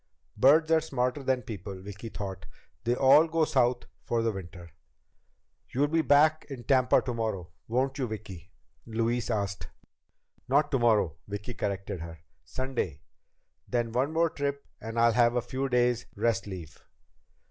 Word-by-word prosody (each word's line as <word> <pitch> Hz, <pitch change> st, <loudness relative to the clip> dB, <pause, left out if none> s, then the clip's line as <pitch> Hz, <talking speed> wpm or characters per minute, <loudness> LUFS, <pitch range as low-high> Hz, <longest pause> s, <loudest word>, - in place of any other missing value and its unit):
Birds 155 Hz, +8 st, +5 dB
are 160 Hz, -1 st, +5 dB
smarter 130 Hz, -2 st, -1 dB
than 130 Hz, -2 st, 0 dB
people, 100 Hz, -3 st, -7 dB
Vicki 105 Hz, +4 st, -8 dB
thought, 95 Hz, -4 st, -6 dB, 0.4 s
they 120 Hz, +1 st, +2 dB
all 140 Hz, +5 st, +6 dB
go 165 Hz, -1 st, +2 dB
South 125 Hz, -4 st, +2 dB, 0.2 s
for 115 Hz, -1 st, 0 dB
the 115 Hz, -, +1 dB
winter. 90 Hz, -3 st, -9 dB, 1.0 s
"You'll 145 Hz, +3 st, +1 dB
be 165 Hz, +1 st, +2 dB
back 155 Hz, +1 st, +4 dB
in 130 Hz, -4 st, -7 dB
Tampa 130 Hz, -1 st, +3 dB
tomorrow, 110 Hz, -8 st, -3 dB, 0.2 s
won't 130 Hz, +4 st, 0 dB
you, 130 Hz, -, 0 dB
Vicki?" 95 Hz, -5 st, -8 dB, 0.4 s
Louise 115 Hz, +2 st, -1 dB
asked. 100 Hz, -3 st, -2 dB, 0.8 s
"Not 145 Hz, +4 st, +2 dB
tomorrow," 110 Hz, -, +2 dB
Vicki 105 Hz, +4 st, -5 dB
corrected 100 Hz, -3 st, -3 dB
her. 80 Hz, 0 st, -8 dB, 0.3 s
"Sunday. 120 Hz, -, -4 dB, 0.6 s
Then 120 Hz, -2 st, -1 dB
one 130 Hz, +5 st, 0 dB
more 165 Hz, 0 st, +2 dB
trip 140 Hz, 0 st, -3 dB, 0.2 s
and 115 Hz, +1 st, -6 dB
I'll 115 Hz, 0 st, +5 dB
have 120 Hz, 0 st, +4 dB
a -, -, +3 dB
few 130 Hz, +3 st, -3 dB
days' 125 Hz, -1 st, +1 dB
rest 110 Hz, -4 st, 0 dB
leave." 85 Hz, -6 st, -9 dB
120 Hz, 145 wpm, -28 LUFS, 100-135 Hz, 1.0 s, all